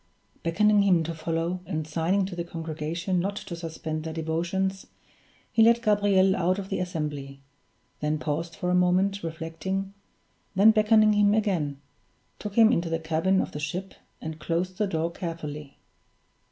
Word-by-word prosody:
Beckoning 205 +5 +3
him 180 -4 +4
to 165 +1 -4
follow, 165 +2 -2
and 155 -4 -2
signing 170 +5 +1
to 185 -1 -6
the 170 - -3
congregation 165 +2 -3
not 200 +3 -1
to 185 -3 -6
suspend 160 -2 -5
their 160 0 -5
devotions, 175 +4 -2 0.6
he 225 - +3
led 235 +1 +5
Gabriel 200 -3 +4
out 185 +1 +1
of 195 -1 -6
the 195 - -1
assembly 150 -6 -4 0.6
then 150 +1 0
paused 160 +2 -3
for 180 -1 -2
a - - +2
moment, 185 +2 +2
reflecting 165 +4 -4 0.6
then 205 +4 +7
beckoning 215 0 +5
him 205 0 +4
again, 170 -10 0 0.6
took 210 -1 -6
him 225 -1 +7
into 170 -6 0
the 165 - 0
cabin 165 +4 +1
of - - -4
the 150 - -6
ship, 180 +6 -4 0.3
and 160 0 -6
closed 180 +3 -2
the 210 - +2
door 165 -2 -1
carefully. 150 -5 -6
175 Hz, 160 wpm, -27 LUFS, 160-195 Hz, 0.6 s, then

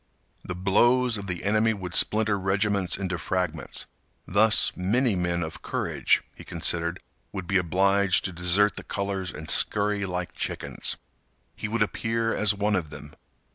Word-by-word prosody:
The 90 - -5
blows 120 +6 +3
of 100 -2 -5
the 90 -2 -4
enemy 110 +2 +2
would 90 -3 -7
splinter 105 -1 +3
regiments 95 -1 0
into 95 -3 -3
fragments. 90 -1 -2 0.4
Thus, 105 +3 +4
many 110 +5 +1
men 85 -1 -1
of 80 -1 -7
courage, - - 0
he - - -13
considered, 85 +1 -1 0.3
would 95 -3 -6
be 95 +2 +1
obliged 95 +2 +2
to 95 - -2
desert 90 +4 +3
the - - -6
colors 100 -2 -3
and 80 +1 -9
scurry 105 -1 +2
like 90 -1 -4
chickens. - - -3 0.6
He - - -4
would 110 0 +1
appear 115 +2 -1
as 105 -1 +2
one 105 +1 0
of 85 -5 -2
them. 75 0 -11
100 Hz, 155 wpm, -26 LUFS, 90-105 Hz, 0.6 s, Thus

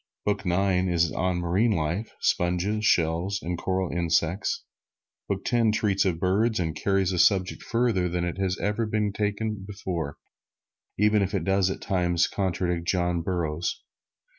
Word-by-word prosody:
Book 100 -2 -1
Nine 90 0 +2
is 85 -2 +2
on 90 -1 0
marine 95 +7 +2
life 85 +7 -2
sponges, 90 +5 0
shells 85 +1 +2
and 90 +2 -2
coral 95 +1 -2
insects. 85 +2 0 0.7
Book 100 -1 -2
Ten 115 -3 +3
treats 100 -2 +1
of 85 -4 0
birds, 105 +5 +1
and 80 -3 -1
carries 95 +2 +1
the 90 - -1
subject 95 -1 +3
further 115 -7 +1
than 90 0 -1
it 90 +2 -4
had 95 -1 0
ever 105 +2 -1
been 105 -1 0
taken 105 0 -2
before, 90 -7 -4 0.8
even 105 +1 +3
if 100 +1 -1
it 95 - -1
does 95 -1 +2
at - - -4
times 90 -3 +1
contradict 90 -3 -2
John 90 -2 +1
Burroughs. 85 -2 -2
95 Hz, 155 wpm, -26 LUFS, 85-105 Hz, 0.8 s, Ten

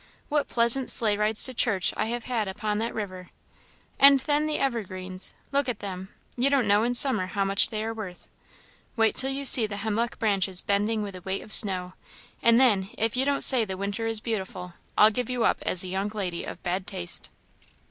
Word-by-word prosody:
What 290 -1 -1
pleasant 235 +2 +1
sleigh 215 -3 +2
rides 210 +1 +3
to 260 - +5
church 210 -6 +1
I - - -2
have 240 +1 -4
had 230 -4 -3
upon 210 +2 -4
that 230 +1 -3
river! 185 -4 -7 0.7
And 275 0 +7
then 295 +2 0
the 305 - -2
evergreens, 185 -7 -4 0.2
look 280 -2 0
at 240 - -3
them; 190 -2 -8 0.3
you 255 +3 +1
don't 270 -5 +1
know 205 +1 +3
in 245 +2 -1
summer 230 -8 +2
how 195 +1 -2
much 195 0 +6
they 215 -1 -4
are 225 +1 -4
worth. 200 -5 -10 0.7
Wait 225 -2 +2
till 265 - +2
you 275 +1 -3
see 235 -4 +8
the 205 -1 -7
hemlock 220 +3 -3
branches 195 -4 0
bending 210 +2 -1
with 200 -2 -8
a 185 - -10
weight 190 +2 -5
of 215 - -10
snow, 185 -4 +2 0.5
and 230 0 +4
then, 205 -7 +2
if 225 +1 -1
you 260 +1 +1
don't 280 0 0
say 255 -4 +6
the 190 -3 -6
winter 200 +3 -4
is 225 -1 -3
beautiful, 190 -6 -6 0.2
I'll 215 +1 +6
give 245 +2 -4
you 250 -2 -2
up - - +1
as 180 - +3
a - - -7
young 190 +2 -3
lady 190 -5 -5
of - - -10
bad 180 +2 -3
taste." 85 - -2
215 Hz, 210 wpm, -25 LUFS, 195-240 Hz, 0.7 s, see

